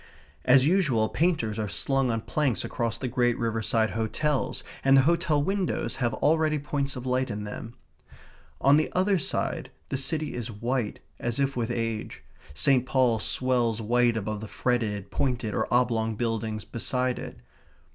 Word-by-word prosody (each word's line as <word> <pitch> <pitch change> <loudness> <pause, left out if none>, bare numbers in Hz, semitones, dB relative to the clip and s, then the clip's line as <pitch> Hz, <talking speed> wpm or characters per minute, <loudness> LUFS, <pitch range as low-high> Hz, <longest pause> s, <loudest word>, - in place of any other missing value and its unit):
As 130 +1 +6
usual, 150 - +2
painters 140 -11 0
are 105 -2 -2
slung 135 +2 +1
on 115 -1 0
planks 140 -1 0
across 115 -2 -2
the 130 - -3
great 120 -1 +1
riverside 115 -1 0
hotels, 130 +6 -1 0.2
and 135 0 +6
the 135 - +6
hotel 165 -1 +2
windows 195 +1 -1
have 120 -3 0
already 155 +3 +2
points 140 -1 -2
of 125 0 -6
light 130 0 0
in 105 -1 -4
them. 110 +3 -7 0.8
On 140 +2 +5
the 155 - 0
other 190 +1 +2
side - - -2 0.2
the 135 - -1
city 150 +2 -1
is 120 -1 -4
white 115 +1 -2 0.2
as 120 +2 -2
if 140 0 +1
with 120 -2 -1
age; 115 -2 -3 0.3
St. 135 - +3
Paul's 125 -4 +2
swells 120 -3 +1
white 120 +1 +2
above 110 0 -3
the 110 - -6
fretted, 105 -5 -1
pointed, 120 -5 -1
or - - -1
oblong 115 -3 +2
buildings 110 -1 -2
beside 125 +2 -1
it. - - -8
125 Hz, 160 wpm, -27 LUFS, 115-140 Hz, 0.8 s, As